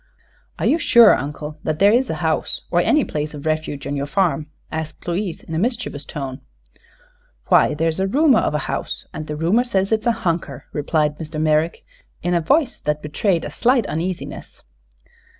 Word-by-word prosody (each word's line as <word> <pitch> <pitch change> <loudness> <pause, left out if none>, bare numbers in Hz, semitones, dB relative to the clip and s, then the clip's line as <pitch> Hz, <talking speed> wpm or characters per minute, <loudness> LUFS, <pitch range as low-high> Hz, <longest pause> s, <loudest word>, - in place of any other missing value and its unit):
"Are - - -2
you 320 - +3
sure, 235 -8 +7
Uncle, 150 +2 -6
that 155 -1 -1
there 200 +3 +5
is 250 +3 +2
a - - -1
house, - - 0
or - - +3
any 305 -2 +3
place 150 0 -4
of 145 +1 -9
refuge, 155 -2 -2
on 145 - -2
your 140 0 -2
farm?" 165 -2 0 0.2
asked 160 +1 -6
Louise, 175 0 -2
in 165 - -8
a 160 - 0
mischievous 230 - -2
tone. 135 -3 -6 1.1
"Why, 150 - +5
there's 160 +2 0
a 190 - +1
rumor 275 +3 +4
of - - 0
a 150 - -2
house, - - -4
and 155 - -6
the 150 - -4
rumor 175 +10 +2
says 195 -5 0
it's 220 +1 +1
a - - +5
hunker," 165 -6 -2
replied 150 0 0
Mr. 155 -1 -5
Merrick, 155 +1 +1 0.4
in 175 - 0
a 170 - +2
voice 280 - +1
that 150 0 -2
betrayed 165 +3 0
a - - -6
slight 245 -2 +2
uneasiness. 175 +2 -5
165 Hz, 185 wpm, -21 LUFS, 150-205 Hz, 1.1 s, sure